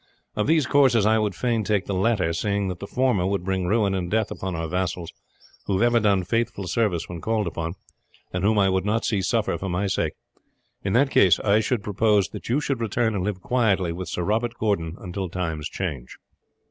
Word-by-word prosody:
Of 105 - 0
these 155 -2 +3
courses 130 -6 +4
I 110 +1 +4
would 105 -3 -1
fain 115 -1 0
take 105 -2 0
the 100 - -3
latter, 95 -3 +1
seeing 100 +2 -1
that 90 -1 -5
the 100 - -7
former 125 -8 +1
would 100 -2 -1
bring 95 -1 -1
ruin 105 0 +2
and 90 -2 -2
death 110 +1 0
upon 95 -2 -4
our 80 0 -3
vassals, 90 0 -3 0.5
who 100 - 0
have 95 - +2
ever 120 0 +4
done 100 -4 +2
faithful 115 0 -1
service 95 -6 0
when 85 -2 -7
called 110 +1 0
upon, 85 +1 -4 0.6
and 90 +1 -2
whom 105 +1 +3
I 100 -1 +4
would 95 0 +1
not 110 +3 0
see 105 -4 +1
suffer 110 +3 0
for 95 - -4
my 90 +3 -1
sake. 95 - -1 0.7
In 95 - -1
that 135 +3 +3
case 90 -4 +5
I 105 0 +3
should 110 0 -1
propose 105 -1 +2
that - - -8
you 130 +5 +2
should 135 -5 -2
return 115 +1 0
and 95 -3 -1
live 95 -2 -3
quietly 100 -7 +1
with 90 +2 -6
Sir 90 - -2
Robert 115 +5 0
Gordon 90 -6 -1
until 95 0 -5
times 80 -4 -3
change." 75 -10 -5
100 Hz, 215 wpm, -24 LUFS, 90-110 Hz, 0.7 s, case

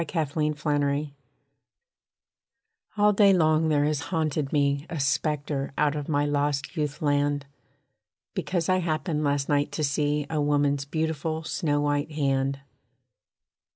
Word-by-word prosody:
A - - -11 0.3
WOMAN'S 150 -1 -1
HAND 145 -1 0 1.9
All 210 0 +4
day 200 -1 +5
long 160 -2 +3
there 145 -1 +3
has 150 -1 0
haunted 155 -4 -1
me 140 0 +1
A 165 - -4
spectre 140 0 -1
out 150 0 +2
of 145 0 -5
my 145 -1 +2
lost 145 +1 -1
youth 150 -1 -3
land. 145 -1 +1 0.9
Because 175 -3 -2
I 185 0 +3
happened 160 -2 -1
last 140 -1 0
night 145 -1 +1
to 155 - -2
see 145 +1 0
A 155 -2 -1
woman's 145 -1 +1
beautiful 160 +1 -2
snow 145 -2 -1
white 145 +1 -1
hand. 135 -2 0
150 Hz, 135 wpm, -26 LUFS, 145-155 Hz, 1.9 s, day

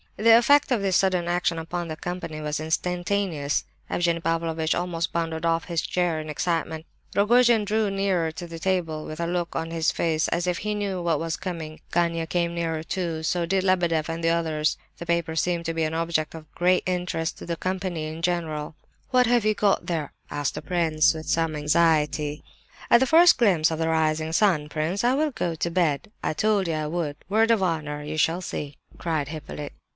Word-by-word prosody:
The 225 +1 +7
effect 285 +4 +4
of 235 -5 +2
this 190 -2 +3
sudden 185 -3 +1
action 175 -1 0
upon 170 +1 -4
the 155 - -4
company 165 -2 -5
was 150 0 -2
instantaneous. 175 -1 -1 0.2
Evgenie 170 -1 +1
Pavlovitch 165 -1 0
almost 170 -2 -2
bounded 165 -1 -2
off 165 0 +1
his 170 -3 -1
chair 175 -2 0
in 155 0 -6
excitement. 160 0 -2 0.3
Rogojin 230 +1 +4
drew 215 0 +1
nearer 195 -4 0
to 165 +2 -7
the 165 -1 -8
table 165 -4 -1
with 155 +1 -7
a 170 - 0
look 175 -1 -2
on 165 0 -3
his 165 -1 +1
face 160 -2 0
as 170 +1 -1
if 180 -1 -1
he 210 0 -2
knew 200 -3 -2
what 165 -3 +1
was 165 0 -2
coming. 165 -4 -6
Gania 170 -1 +1
came 170 0 0
nearer 165 -2 -2
too; 165 -2 -3
so 170 +2 0
did 190 +1 +1
Lebedeff 175 -4 +1
and 165 0 -4
the 165 - +3
others—the 160 0 -1
paper 170 -1 0
seemed 170 +1 0
to 165 - -1
be 165 0 -1
an 155 +1 -1
object 165 -1 -1
of 155 -2 -12
great 180 +1 +2
interest 180 -3 -2
to - - -8
the 170 - -1
company 185 -3 -3
in 160 +1 -7
general. 160 -4 -2 0.3
"What 250 -1 +4
have 240 -2 +3
you 215 0 +3
got 205 -2 +2
there?" 160 -5 -2 0.2
asked 145 -1 -2
the - - -5
prince, 160 -4 +2
with 160 0 -7
some 165 -1 +1
anxiety. 150 -1 +1 0.5
"At 235 - +8
the 265 - +2
first 340 +4 +7
glimpse 175 -9 +4
of 160 - -3
the 165 0 0
rising 160 0 +1
sun, 165 -6 +2
prince, 160 +7 -1
I 245 +1 +4
will 305 +1 +1
go 170 -9 -2
to 170 +2 -2
bed. 165 -1 0
I - - 0
told 205 +2 +1
you 165 - 0
I 155 -1 -2
would, 155 -3 -3
word 220 +3 +3
of 225 -3 +3
honour! 150 -4 -2
You 155 +1 -5
shall 165 +3 +2
see!" 145 -5 -5 0.2
cried 160 -4 -1
Hippolyte. 150 -2 -7
170 Hz, 200 wpm, -25 LUFS, 160-180 Hz, 0.5 s, At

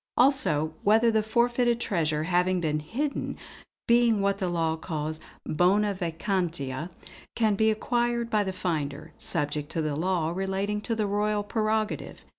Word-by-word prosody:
Also 240 - +3
whether 225 +3 +4
the 220 -1 +2
forfeited 235 +2 +1
treasure 155 -9 0
having 180 +2 +2
been 155 -3 0
hidden, 270 - -3 0.5
being 235 -2 +4
what 200 0 +1
the 185 -3 -1
law 165 -2 0
calls 155 -1 -4 0.3
'bona 200 +6 +2
vacantia,' 170 -5 -2 0.5
can 220 -2 +2
be 220 +2 +3
acquired 235 +2 0
by 215 -3 +1
the 190 - -2
finder, 155 -6 -3
subject 150 -2 0
to - - -2
the 155 -2 -1
law 170 0 0
relating 195 +3 -2
to 230 +2 -2
the 215 -1 0
Royal 205 +1 0
prerogative. 215 0 -2
195 Hz, 145 wpm, -27 LUFS, 160-220 Hz, 0.5 s, whether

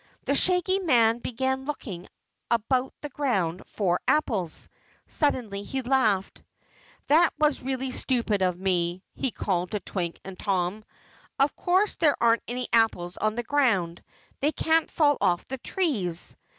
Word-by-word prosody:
The - - +1
Shaggy 365 +4 +3
Man 240 -10 +3
began 265 +2 -2
looking 205 -11 -6 0.4
about 250 +3 +1
the 295 - -5
ground 195 - -1
for 180 -4 0
apples. 210 - 0 0.4
Suddenly 245 -9 -1
he 265 +6 -4
laughed. 225 -7 +1 0.6
"That 320 +4 +5
was 300 -1 +2
really 260 0 -3
stupid 235 -6 0
of 180 -2 +1
me," 180 -1 0
he 270 - -1
called 180 -5 -2
to 210 - 0
Twink 175 -3 -4
and 190 -1 -9
Tom. 195 +1 -1 0.5
"Of 275 +1 +2
course 375 +4 +1
there 305 -4 +3
aren't 230 0 +3
any 250 +1 -2
apples 200 -6 +2
on 215 0 0
the 240 - -2
ground. 220 -12 +1 0.4
They 295 +2 +2
can't 320 0 +1
fall 290 -3 +2
off 180 -3 +1
the 265 0 -6
trees!" 220 - -1
235 Hz, 145 wpm, -26 LUFS, 190-280 Hz, 0.6 s, That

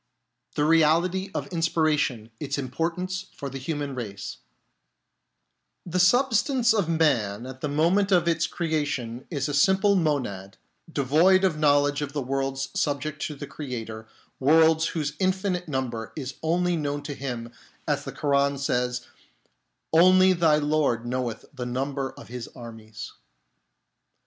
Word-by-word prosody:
The 150 - +2
Reality 165 +4 +3
of - - -2
Inspiration: 155 - 0
its 140 -1 -3
Importance 170 +8 -3
for 140 -2 -6
the 135 - -6
Human 145 0 -3
Race 100 -6 -6 1.5
The 180 +1 -1
substance 240 +4 +3
of 200 -7 0
man 120 -10 +1
at 130 0 -9
the 150 - -2
moment 175 +7 +2
of 175 -2 +4
its 165 -1 +2
creation 145 -8 -2
is 145 -4 -2
a 145 - -3
simple 190 +7 +4
monad, 125 - -1 0.3
devoid 160 +7 +4
of 170 -5 +1
knowledge 145 -1 +3
of 145 -1 -4
the 145 - -1
worlds 135 +1 -2
subject 145 +1 -2
to 150 - -7
the 145 - -7
Creator, 115 -7 -6 0.3
worlds 160 +3 +4
whose 150 -3 -2
infinite 185 -1 0
number 125 -6 -3
is 135 -3 -5
only 175 +2 +1
known 145 -2 -2
to 145 0 -5
Him, 125 -4 -5 0.4
as - - 0
the - - -6
Koran 140 -1 +1
says: 125 -2 -1 0.5
" - - -50
Only 185 +3 +6
thy 165 -3 +4
Lord 145 -6 +1
knoweth 120 -2 -3
the 125 -3 -5
number 135 +2 -2
of - - -13
His 125 -1 -6
armies." 110 -3 -9
145 Hz, 140 wpm, -26 LUFS, 130-165 Hz, 1.5 s, Only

